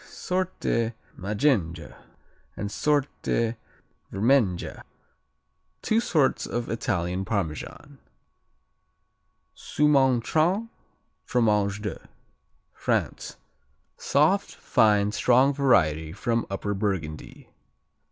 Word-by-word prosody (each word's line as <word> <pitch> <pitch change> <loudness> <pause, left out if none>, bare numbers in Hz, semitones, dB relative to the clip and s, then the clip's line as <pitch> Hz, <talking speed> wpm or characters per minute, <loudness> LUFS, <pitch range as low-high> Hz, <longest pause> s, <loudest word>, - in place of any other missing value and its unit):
Sorte 180 -11 -2 0.2
Maggenga 100 - -1 0.6
and 100 - -4
Sorte 135 -5 0 0.6
Vermenga 105 -4 +1 1.0
Two 220 - +2
"sorts" 155 - +1
of 120 0 -3
Italian 95 -5 -2
Parmesan. 95 -7 -4 1.6
Soumaintrain, 150 - +2 0.5
Fromage 105 -3 +1
de 105 - -6 0.6
France - - -2 0.6
Soft; - - +1
fine; 105 -2 +2
strong 130 +5 +3
variety 80 - +2
from 115 +5 -1
Upper 100 +1 -3
Burgundy. 95 -7 -4
110 Hz, 70 wpm, -26 LUFS, 95-135 Hz, 1.6 s, strong